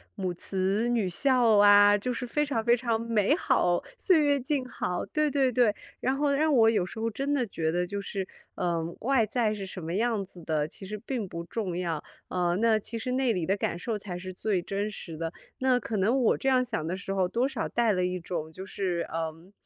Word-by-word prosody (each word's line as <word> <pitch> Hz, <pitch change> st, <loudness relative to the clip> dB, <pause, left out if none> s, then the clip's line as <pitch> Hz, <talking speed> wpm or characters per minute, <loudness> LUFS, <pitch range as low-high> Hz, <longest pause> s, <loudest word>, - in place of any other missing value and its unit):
母 185 Hz, -4 st, -2 dB
慈 195 Hz, +5 st, -1 dB
女 230 Hz, -6 st, +1 dB
孝 240 Hz, +2 st, +4 dB
啊， 205 Hz, 0 st, +7 dB
就 250 Hz, +5 st, -2 dB
是 245 Hz, +1 st, -4 dB
非 295 Hz, +5 st, 0 dB
常 240 Hz, -6 st, -1 dB
非 240 Hz, +1 st, +4 dB
常 230 Hz, -2 st, -1 dB
美 230 Hz, +2 st, +2 dB
好， 175 Hz, -, +2 dB, 0.2 s
岁 360 Hz, -9 st, +4 dB
月 285 Hz, -1 st, +3 dB
静 270 Hz, +1 st, -1 dB
好。 180 Hz, -7 st, -3 dB
对 305 Hz, -1 st, 0 dB
对 270 Hz, -3 st, +2 dB
对， 240 Hz, -3 st, +3 dB, 0.3 s
然 260 Hz, +1 st, +1 dB
后 285 Hz, 0 st, +1 dB
让 305 Hz, +2 st, +2 dB
我 225 Hz, -4 st, +6 dB
有 215 Hz, -5 st, +1 dB
时 190 Hz, -, -8 dB
候 225 Hz, +1 st, 0 dB
真 275 Hz, +6 st, -2 dB
的 265 Hz, -4 st, +1 dB
觉 160 Hz, -4 st, -1 dB
得 175 Hz, +1 st, 0 dB
就 200 Hz, +1 st, -4 dB
是， 195 Hz, -1 st, -4 dB, 0.3 s
嗯， 170 Hz, -1 st, -2 dB
外 255 Hz, -2 st, +3 dB
在 220 Hz, 0 st, 0 dB
是 205 Hz, -2 st, -4 dB
什 185 Hz, -2 st, -8 dB
么 165 Hz, +2 st, -3 dB
样 225 Hz, -1 st, +1 dB
子 185 Hz, -1 st, -13 dB
的， 155 Hz, -2 st, 0 dB
其 195 Hz, -, -9 dB
实 210 Hz, +2 st, -5 dB
并 240 Hz, -7 st, -3 dB
不 170 Hz, -1 st, -6 dB
重 190 Hz, -3 st, -3 dB
要， 170 Hz, -4 st, -2 dB, 0.2 s
啊， 175 Hz, -1 st, 0 dB
那 220 Hz, +2 st, +3 dB
其 225 Hz, +2 st, -5 dB
实 250 Hz, +3 st, -3 dB
内 255 Hz, -2 st, +2 dB
里 175 Hz, -5 st, -2 dB
的 195 Hz, -, +1 dB
感 170 Hz, -, -2 dB
受 225 Hz, +3 st, -2 dB
才 195 Hz, -3 st, -6 dB
是 185 Hz, +1 st, -6 dB
最 185 Hz, 0 st, -1 dB
真 200 Hz, +3 st, -2 dB
实 165 Hz, -5 st, -8 dB
的， 165 Hz, +1 st, -4 dB, 0.2 s
那 255 Hz, -1 st, +2 dB
可 220 Hz, -2 st, -3 dB
能 230 Hz, +8 st, +2 dB
我 235 Hz, -, +3 dB
这 -, -, -3 dB
样 260 Hz, -1 st, +4 dB
想 160 Hz, -10 st, -3 dB
的 170 Hz, +3 st, -2 dB
时 195 Hz, 0 st, -6 dB
候， 190 Hz, -2 st, +1 dB
多 235 Hz, +7 st, +1 dB
少 265 Hz, -5 st, -3 dB
带 235 Hz, -2 st, +2 dB
了 180 Hz, -2 st, +1 dB
一 180 Hz, 0 st, -2 dB
种 165 Hz, -2 st, -5 dB
就 185 Hz, +3 st, -8 dB
是， 185 Hz, -3 st, -2 dB
嗯， 165 Hz, +2 st, -5 dB
210 Hz, 250 characters per minute, -28 LUFS, 180-245 Hz, 0.3 s, 啊